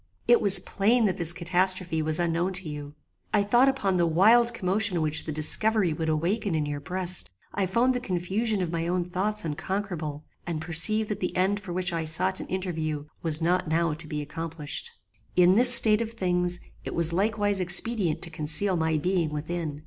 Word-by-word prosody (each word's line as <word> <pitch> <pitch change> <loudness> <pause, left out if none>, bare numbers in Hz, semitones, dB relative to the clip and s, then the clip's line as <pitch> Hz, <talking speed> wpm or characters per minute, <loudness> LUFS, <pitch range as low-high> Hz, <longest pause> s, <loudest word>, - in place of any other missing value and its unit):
It 240 0 +4
was 200 -2 +10
plain 225 +4 0
that 190 -4 -1
this 170 -2 -1
catastrophe 180 -1 -1
was 155 +1 0
unknown 170 +2 -1
to 185 -2 0
you: 145 -1 -8 0.4
I 205 - +2
thought 240 +6 +3
upon 200 -9 -1
the 170 -1 +1
wild 225 +9 +4
commotion 200 -3 -1
which 155 0 -1
the 155 - -5
discovery 185 +5 +1
would 160 +1 -4
awaken 175 +5 -1
in 155 -1 -1
your 145 0 -5
breast: 180 +4 -2 0.2
I 195 -2 -1
found 235 +7 +1
the 250 - -2
confusion 195 +1 -2
of 170 - -4
my 165 -1 -3
own 175 0 -1
thoughts 195 +3 -3
unconquerable, 160 -2 -5 0.2
and 165 -3 -3
perceived 175 +7 +4
that 210 -2 -4
the 180 - -4
end 195 +3 0
for 195 -3 -10
which 180 0 -3
I 165 -1 -3
sought 185 +4 +2
an - - -8
interview 160 -5 -4 0.2
was 160 -1 +4
not 180 +1 0
now 165 0 0
to 160 +1 -7
be 150 -1 -5
accomplished. 165 - -6 0.5
"In 180 0 +4
this 245 +4 +4
state 220 -2 +7
of 225 0 -5
things 180 -4 0 0.2
it - - -6
was 170 0 +2
likewise 205 +1 0
expedient 185 0 0
to 170 - -3
conceal 155 +5 -1
my 160 -1 0
being 175 0 -1
within. 150 0 -5
180 Hz, 195 wpm, -25 LUFS, 160-200 Hz, 0.5 s, was